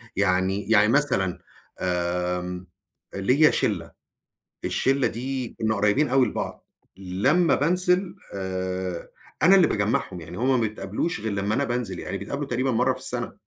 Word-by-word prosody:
يعني 95 +1 +1
يعني 105 -1 +6
مثلًا 115 -9 +1 0.4
آمم 90 0 -2 0.5
ليّا 130 +11 +4
شِلّة، - - -1 0.7
الشلّة 135 -1 +1
دي 125 +2 -3
كنا 110 0 +1
قريبين 105 +8 +2
أوي 130 0 +4
لبعض. - - -5 0.3
لمّا 115 - +2
بانزل 180 +4 +1 0.2
آآ، 95 -2 -3 0.3
أنا 195 +2 +7
اللي 180 -3 +6
باجمعهُم 105 -4 -1
يعني 85 +3 -9
هُم 130 +1 +2
ما 110 - +2
يتقابلوش 110 - -3
غير 110 -1 -3
لمّا 100 +1 -1
أنا 140 - +1
بانزل، 120 -8 -3
يعني - - -4
بيتقابلوا 140 +8 -4
تقريبًا 130 +2 0
مرّة 125 +3 +2
في - - -8
السّنة. - - -4
110 Hz, 145 wpm, -25 LUFS, 95-135 Hz, 0.7 s, أنا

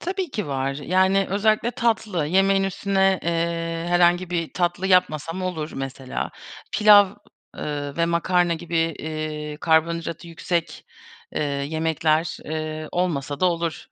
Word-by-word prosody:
Tabii 370 -1 -3
ki 210 - -3
var. 135 0 -2
Yani, 190 +6 +2
özellikle 215 +3 +2
tatlı. 220 - 0
Yemeğin 195 +3 +3
üstüne, 195 0 +1
eee, 165 0 -1
herhangi 175 0 +3
bir 165 -2 -2
tatlı 175 +1 -1
yapmasam 180 -1 +1
olur 165 -4 -3
mesela. 135 -1 -5 0.4
Pilav, 205 -2 +7 0.5
ııı, 145 -1 -4
ve 170 - +2
makarna 170 +1 +2
gibi, 170 +1 -4
eee, 155 -2 -3
karbonhidratı 165 +1 0
yüksek, 170 0 -3 0.5
eee, - - 0
yemekler, 155 +2 0
eee, 155 0 -4
olmasa 145 -6 -1
da 185 - +4
olur 170 -2 -2
170 Hz, 125 wpm, -23 LUFS, 155-185 Hz, 0.5 s, Pilav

